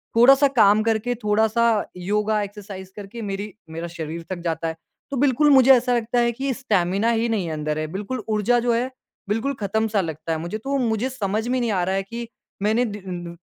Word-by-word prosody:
थोड़ा-सा 270 +4 +7
काम 210 +1 +6
करके, 225 +2 0
थोड़ा-सा 220 0 +2
योगा 210 +3 0
एक्सरसाइज़ 195 -2 -9
करके 210 +3 -8
मेरी 200 0 -4 0.2
मेरा 165 +2 -5
शरीर 165 +1 -5
थक 180 - -3
जाता 165 0 -2
है। 160 - -3 0.4
तो 275 - -2
बिल्कुल 285 +2 +3
मुझे 265 -1 +7
ऐसा 245 0 +3
लगता 235 +1 0
है 235 0 +3
कि 265 +3 -2
स्टैमिना 205 -3 +1
ही 230 0 +1
नहीं 195 -7 -1
अंदर 155 0 -2
है। 155 - -2
बिल्कुल 210 +6 -4
ऊर्जा 215 +3 +2
जो 240 0 +1
है, 245 +2 0 0.4
बिल्कुल 225 +7 0
खत्म-सा 215 0 0
लगता 160 -1 -5
है 160 - 0
मुझे। 170 +6 -4
तो 275 +5 -2
मुझे 235 0 0
समझ 220 -2 -2
में 255 +1 +1
नहीं 235 -2 0
आ 185 -3 +1
रहा 190 +2 0
है 195 - 0
कि 230 +4 -6 0.4
मैंने 225 +4 +2
डी 180 -5 -6
215 Hz, 200 wpm, -23 LUFS, 190-240 Hz, 0.4 s, थोड़ा-सा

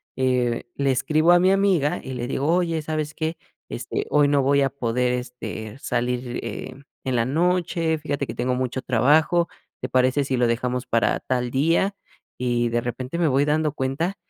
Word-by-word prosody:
eh, 125 -2 +1
le 140 -1 +1
escribo 155 +6 +3
a 175 - +6
mi 185 +1 +4
amiga 190 -7 +2
y 130 - -6
le 120 -1 -4
digo: 135 +2 -1
“Oye, 165 -3 0
¿sabes 155 -1 -3
qué? 160 +1 -3 0.3
Este, - - -4
hoy 145 -1 +4
no 140 -1 +3
voy 140 +1 +3
a 135 - +2
poder, 125 -1 0
este, 125 -2 -6
salir, 125 -1 -2
em, 130 +2 -7 0.2
en 130 -1 -1
la 115 - +2
noche, 165 +2 +1
fíjate 145 -2 -3
que 115 - -6
tengo 125 +1 0
mucho 130 0 -2
trabajo. 150 +7 +3 0.3
¿Te 130 - -3
parece 130 +2 +2
si 135 -2 -1
lo 120 - +3
dejamos 125 +2 -1
para 115 - +1
tal 125 -1 -2
día?”. 165 +8 +2 0.4
Y 120 -1 0
de 120 0 0
repente 125 +6 -4
me 170 - +3
voy 140 +1 +3
dando 150 0 +1
cuenta 155 +8 -2
135 Hz, 185 wpm, -23 LUFS, 125-155 Hz, 0.4 s, a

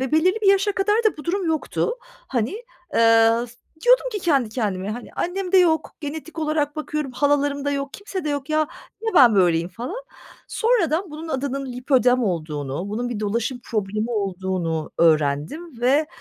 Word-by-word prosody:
ve 265 - -3
belirli 370 +7 +3
bir 400 - +4
yaşa 395 +1 +1
kadar 395 +2 +1
da 435 - +2
bu 300 - -9
durum 365 +1 -1
yoktu, 320 +8 -1 0.3
hani. 235 -3 0 0.4
Iıı, 230 +1 +5 0.4
diyordum - - +5
ki 415 - -2
kendi 280 -10 +2
kendime, 205 -4 -2
hani, 240 +2 -7
annemde 375 +1 -1
yok, 320 -3 +2
genetik 315 +2 -7
olarak 305 -1 -1
bakıyorum, 305 -3 -3
halalarımda 285 +1 +1
yok, 280 0 -3
kimse 395 -4 -6
de - - -1
yok, 285 +1 -3
ya 310 0 +2 0.4
niye 445 -2 -2
ben 250 - +7
böyleyim 175 -3 +3
falan. 250 - -6 0.5
Sonradan 395 -7 +1
bunun 315 +2 -7
adının 275 -1 -2
Lipödem 250 0 +2
olduğunu, 155 - -3
bunun 235 +4 -2
bir 230 -4 -4
dolaşım 230 +4 -2
problemi 215 +1 -2
olduğunu 185 -6 -2
öğrendim 165 - +1
ve, 280 +5 +3
275 Hz, 160 wpm, -22 LUFS, 215-320 Hz, 0.5 s, ben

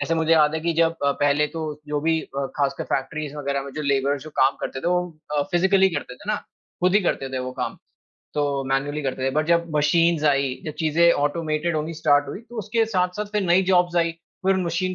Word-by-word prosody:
जैसे 145 +3 0
मुझे 160 0 +2
याद 155 -1 +4
है 160 - -1
कि 170 +1 0
जब 165 0 +2
अ, 140 - +3
पहले 145 +1 +3
तो 160 - -2 0.2
जो 150 0 -1
भी 160 +1 +1
अ, 140 0 -4
खासकर 140 -1 -1
फैक्टरीज़ 150 +2 -4
वगैरह 140 -1 -2
में 140 - -8
जो 155 - -2
लेबर्स 140 0 +1
जो 155 - -10
काम 135 +1 +4
करते 130 - -4
थे - - -4
वो 180 0 +2 0.4
अ, - - +3
फिजिकली 190 +2 +4
करते 145 -4 -4
थे 205 +12 -6
ना, 210 - +1 0.5
खुद 180 +1 +3
ही 210 - +6
करते 135 -6 -1
थे - - -1
वो - - -6
काम। - - -3 0.6
तो 145 -2 0
मैनुअली 135 +3 -1
करते 130 -1 -3
थे। 135 - +2
बट 155 +3 0
जब 170 0 +2
मशीन्स 160 +1 +3
आईं, 140 -3 +1
जब 155 - -4
चीज़ें 165 +2 +4
ऑटोमेटेड 155 +2 -1
होनी 155 +2 -3
स्टार्ट 145 -3 +2
हुई 145 - -6
तो 240 - -7
उसके 220 +2 +1
साथ-साथ 185 0 -1
फिर 210 -1 +1
नई 180 +1 +4
जॉब्स 175 -1 +3
आईं। 170 -1 +2 0.3
फिर 195 - +5
उन 190 - 0
मशीन 185 +2 -1
155 Hz, 235 wpm, -23 LUFS, 145-170 Hz, 0.6 s, ही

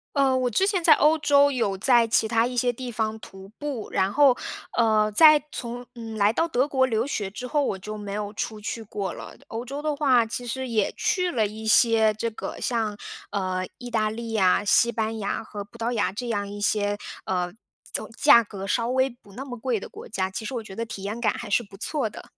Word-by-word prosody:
呃， 270 -2 +3
我 255 -1 +1
之 245 - +2
前 390 -3 +1
在 315 - +8
欧 305 +2 +4
洲 285 -1 +4
有 230 -7 0
在 235 +3 +4
其 220 0 +2
他 230 +1 +2
一 250 0 -5
些 245 0 +2
地 250 +1 -6
方 220 0 -2
徒 195 -2 -12
步。 280 -7 -5
然 190 0 +1
后， 275 -1 +5 0.4
呃， 215 -2 +3
在 305 +7 +7
从 245 -2 -6
嗯， 225 -2 -7
来 205 0 +3
到 330 - +1
德 275 -4 +1
国 265 -2 +2
留 225 -2 0
学 210 -8 -2
之 210 +6 -7
后， 295 +1 +1
我 200 - -1
就 215 +3 -7
没 205 -1 -6
有 205 0 -4
出 215 0 -4
去 225 +2 -4
过 200 -3 -4
了。 - - -9
欧 225 +2 -5
洲 280 +4 -6
的 305 -1 0
话， 260 -5 +4
其 235 +2 -5
实 260 +2 -3
也 220 -4 +1
去 365 -3 0
了 220 -4 +2
一 220 +1 -8
些 220 -1 +4
这 230 +2 -2
个 220 - -7
像， 225 -4 -1 0.3
呃， 185 -2 -2
意 245 -1 -8
大 220 -2 +1
利 230 +1 -6
呀、 195 -2 +3
西 235 +3 +4
班 220 0 -2
牙 200 - -2
和 205 -1 -7
葡 205 - -17
萄 230 +1 -1
牙 220 -5 0
这 240 +4 -5
样 205 -3 -2
一 205 0 -7
些， 205 0 +1 0.3
呃， 180 -1 -1 0.4
怎 - - -3
价 235 - +7
格 195 -2 -7
稍 230 +2 +1
微 260 +1 +2
不 235 -5 -18
那 255 +7 -7
么 250 -3 -7
贵 230 -2 -1
的 - - -8
国 - - -11
家， 190 -2 -2
其 195 - -6
实 240 - -5
我 235 - -3
觉 195 -3 -11
得 230 - -2
体 220 -4 -8
验 210 +4 -4
感 235 - +2
还 235 - -7
是 235 +4 +2
不 200 -1 -14
错 265 +4 -1
的。 - - -11
225 Hz, 255 characters per minute, -25 LUFS, 210-255 Hz, 0.4 s, 在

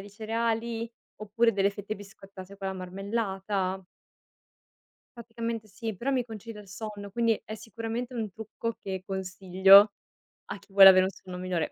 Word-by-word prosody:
di 200 +1 -11
cereali, 230 +2 -2 0.3
oppure 230 +2 +1
delle 200 0 +2
fette 205 +1 -6
biscottate 195 -1 -12
con 195 -1 -6
la 190 - -2
marmellata. 190 0 -3 1.3
Praticamente 230 -1 -5
sì, 215 0 -6
però 265 +8 -2
mi 250 -2 +1
concide 220 -1 -9
il 200 - -15
sonno, 205 0 -7
quindi, 230 +1 +1
è 215 - -6
sicuramente 230 +3 -5
un 220 -4 -3
trucco 225 +3 -5
che 190 -1 -5
consiglio, 190 +1 +5 0.5
a 200 - -7
chi 200 - -23
vuole 195 -1 +11
avere 185 0 +6
un - - -1
sonno 185 -2 -10
migliore, 180 -3 -2
205 Hz, 155 wpm, -28 LUFS, 190-225 Hz, 1.3 s, vuole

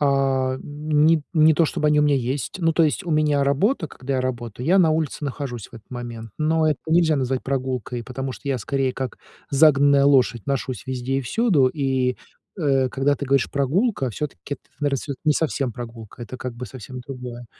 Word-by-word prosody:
А 135 -2 +1
ни 150 +1 +2
не 155 -2 +5
то 165 - +4
чтобы 150 0 -1
они 150 0 +4
у - - +4
меня 145 -1 +3
есть. 130 +6 -3
Ну, 165 -1 +3
то 165 - +3
есть 160 +4 +1
у 175 - -4
меня 150 -2 +2
работа, 160 - +1
когда 135 +1 -5
я 130 - +1
работаю, 120 -1 -4
я 185 +4 +5
на 170 -4 +5
улице 155 -1 -1
нахожусь 130 -5 -5
в - - -16
этот 110 -2 -13
момент, 120 -2 -7
но 155 +1 +2
это 150 - 0
нельзя 160 -1 +4
назвать 130 -1 -1
прогулкой, 130 -3 -3
потому 135 +1 -4
что 140 - -8
я 135 -2 0
скорее 135 +2 -1
как 130 -1 -5 0.3
загнанная 140 -1 +5
лошадь 130 -5 +3
ношусь 135 -3 -2
везде 130 +1 -2
и - - -1
всюду, 150 - +3
и, 130 -3 0 0.4
э, 135 -5 +2
когда 135 +3 +1
ты 140 - -5
говоришь 135 -3 +2
"прогулка", 140 - +1
всё-таки 145 +3 -5
это, - - -22 0.2
наверно, 145 -2 +1
это 140 - -2
не 155 - +4
совсем 145 -5 -1
прогулка, 115 -1 -9
это 125 +2 -7
как 125 -1 -6
бы 125 - -6
совсем 130 0 -9
другое. 125 -2 -8
135 Hz, 200 wpm, -23 LUFS, 125-150 Hz, 0.4 s, не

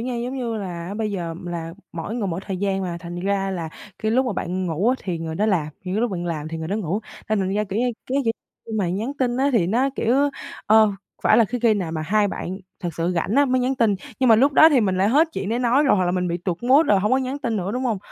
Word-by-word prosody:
nha. 245 +1 -3
Giống 245 +3 -3
như 240 -3 -2
là 185 -3 -5
bây 215 0 -2
giờ 170 -4 -3
là 165 -1 -5 0.2
mỗi 170 +6 -5
người 230 -4 -1
mỗi 180 0 -3
thời 190 - -3
gian 195 0 -1
mà, 175 -2 -3
thành 175 +1 -6
ra 195 +1 0
là 170 -4 -3 0.3
cái 220 - -1
lúc 255 +3 +2
mà 245 - -1
bạn 185 0 -2
ngủ 170 +6 0
á 255 - +4
thì 175 -4 -2
người 160 -1 -4
đó 210 +5 +1
làm, 180 -8 +1 0.2
những 185 - -3
cái 215 - +1
lúc 240 -1 +1
bạn 175 -2 -3
làm 155 -3 -3
thì 165 0 -5
người 160 0 -5
đó 200 - -1
ngủ. 200 0 -2 0.3
Thành 215 - +1
thành 185 - 0
ra, 210 +1 +1
kiểu 200 +2 -3
như, 245 0 +1 0.2
cái 270 +2 0
kỉ 225 - +2 0.4
khi 225 - -7
mà 185 - +1
nhắn 215 +10 -2
tin 245 -2 +1
á, 270 +2 +2
thì 210 -9 +3
nó, 240 +8 +2
kiểu, 235 +2 +2 0.5
ơ, 215 -1 +5 0.3
phải 215 - +5
là 230 - +6
khí 245 +4 -3
khi 225 -2 +5
nào 180 -6 -3
mà 160 -1 -2
hai 205 +5 +2
bạn 190 0 -5 0.2
thật 175 - -2
sự 170 +2 0
rảnh 180 +6 -1
á 285 - +5
mới 255 -1 +1
nhắn 255 +2 +1
tin, 230 -5 +2 0.3
nhưng 260 - +4
mà 225 - +7
lúc 275 +6 +4
đó 315 +3 +8
thì 280 -5 +4
mình 190 -4 +1
lại 195 +2 +3
hết 300 +8 +4
chuyện 195 - -3
để 230 +2 0
nói 250 +3 +3
rồi, 270 - +4
hoặc 185 - +2
là 175 - +1
mình 180 0 0
bị 170 - -1
tụt 175 +2 -4
mood 270 +6 +5
rồi, 200 -2 +4
hông 210 +2 0
có 260 - +4
nhắn 265 +2 -3
tin 235 -6 -2
nữa, 190 +1 -2
đúng 255 +2 -2
hông? 225 -5 0
205 Hz, 305 wpm, -23 LUFS, 180-240 Hz, 0.5 s, đó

